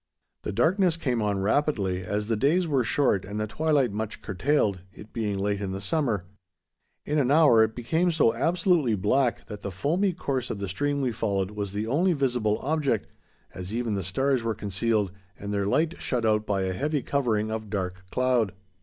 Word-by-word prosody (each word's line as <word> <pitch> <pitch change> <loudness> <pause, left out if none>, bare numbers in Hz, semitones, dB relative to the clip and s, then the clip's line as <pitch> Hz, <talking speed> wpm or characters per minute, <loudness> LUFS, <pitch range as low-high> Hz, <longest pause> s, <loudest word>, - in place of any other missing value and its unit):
The - - -4
darkness 175 - +2
came 125 -8 -1
on 100 -2 0
rapidly, 100 -7 +1
as 105 +3 -2
the 115 - +1
days 160 - +2
were 135 -5 +2
short 115 -6 +2
and 100 +2 -5
the 105 - 0
twilight 145 +1 +1
much 110 +1 -5
curtailed, 105 -1 +1
it 105 +2 -14
being 105 -4 -1
late 100 +1 -1
in 95 -2 -3
the 95 - -4
summer. 115 - -1 0.8
In 150 +1 +1
an 130 -3 +2
hour 140 -7 +6
it 110 0 -1
became 160 +9 +1
so 150 -8 +3
absolutely 165 - +2
black 115 +6 +1
that 105 -1 -8
the 100 - -4
foamy 170 - 0
course 135 -7 -2
of - - -3
the 100 0 -4
stream 145 +9 -1
we 130 -2 0
followed 100 -4 -1
was 105 -2 -4
the 105 +2 -2
only 165 +10 +2
visible 120 -7 +1
object, 140 -6 0 0.4
as 90 +4 -6
even 120 -2 -1
the 100 - -1
stars 130 +8 0
were 115 -1 -1
concealed 105 0 0 0.3
and 100 0 -5
their 100 -1 0
light 160 +9 +2
shut 120 -3 -1
out 110 -1 +2
by 100 -2 0
a 95 0 -1
heavy 145 +6 -1
covering 110 -6 0
of 110 -1 -4
dark 95 -2 -3
cloud. 125 -5 +1
115 Hz, 195 wpm, -26 LUFS, 100-140 Hz, 0.8 s, hour